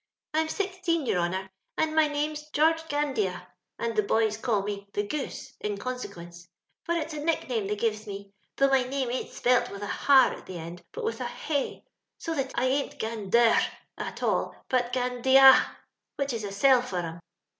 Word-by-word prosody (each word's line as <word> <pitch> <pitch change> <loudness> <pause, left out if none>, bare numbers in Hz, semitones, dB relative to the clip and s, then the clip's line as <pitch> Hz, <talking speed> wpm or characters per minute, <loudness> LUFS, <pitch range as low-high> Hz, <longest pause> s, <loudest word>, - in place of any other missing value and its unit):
I'm 315 +1 +2
sixteen, 370 -5 -1
your 180 - +1
honour, 190 +2 -2 0.3
and 315 0 +1
my 315 -1 +5
name's 300 +1 -3
George 320 +2 +3
Gandea, 265 -10 -1 0.3
and 230 -1 -2
the 215 - +4
boys 220 +1 +1
calls 210 -3 0
me 200 -1 -5
* - - -40
the 205 - +1
Goose 285 +6 -5
' - - -48
in 210 -1 -2
consequence; 175 -8 -7 0.4
for 340 - -1
it's 320 -1 -2
a 300 - -4
nickname 255 -10 0
they 210 - -1
gives 215 0 -1
me, 200 0 -8 0.2
though 275 0 +3
my 270 -1 +4
name 255 -1 -2
ain't 255 - -3
spelt 250 0 +2
with 200 0 -7
a - - -2
har 270 +6 +4
at - - -11
the 185 - -6
end, 170 +2 -8
but - - -6
with 450 - -2
a - - -2 0.2
Vay, 285 -3 -1 0.3
so 330 - -4
that 270 -3 -2
I 245 - +1
ain't 275 +2 0
Gander 225 +1 +2 0.4
after - - -5
all, - - 0
but 245 -1 +1
Gandea, 260 +2 +5 0.4
which 280 -2 -2
is 220 -2 -3
a 200 - -5
sell 255 +5 +5
for 220 -7 -5
'em. 165 -1 -4
250 Hz, 195 wpm, -27 LUFS, 205-290 Hz, 0.4 s, my